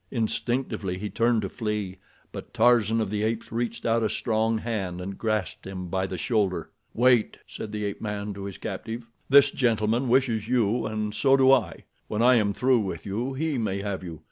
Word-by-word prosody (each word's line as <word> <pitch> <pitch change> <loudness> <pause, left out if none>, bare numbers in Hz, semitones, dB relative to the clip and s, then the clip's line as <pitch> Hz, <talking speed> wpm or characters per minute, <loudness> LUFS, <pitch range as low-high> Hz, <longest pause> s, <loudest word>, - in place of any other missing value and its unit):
Instinctively 115 -4 -2
he 105 +1 -5
turned 115 +1 +2
to - - -1
flee; 105 -5 -3 0.3
but - - -9
Tarzan 115 -1 +4
of 105 -3 -1
the 105 -1 -1
Apes 110 +1 -2
reached 115 +1 -3
out 115 0 +2
a 110 - +1
strong 110 0 0
hand 105 -6 -3
and 95 +2 -5
grasped 110 -6 -2
him 90 -2 -6
by 95 +1 -1
the 95 - -5
shoulder. 95 -2 0 0.2
"Wait!" 120 -2 +3
said 110 - -7
the 105 -1 -3
ape 100 - -4
man 105 -1 -4
to 100 0 -7
his 100 -2 -6
captive. 110 +3 -5 0.2
"This 140 0 +7
gentleman 115 0 +1
wishes 120 -4 +2
you, 120 -1 +1
and 105 -1 -3
so 135 +4 +4
do 130 0 +6
I. 115 -11 +2 0.2
When 110 +2 -1
I 125 +1 +7
am 105 -2 +2
through 125 +4 +2
with 100 -3 -4
you, 115 +7 -2
he 150 -2 -1
may 100 -3 -1
have 100 -2 -3
you. 85 -3 -7
110 Hz, 195 wpm, -26 LUFS, 100-120 Hz, 0.3 s, This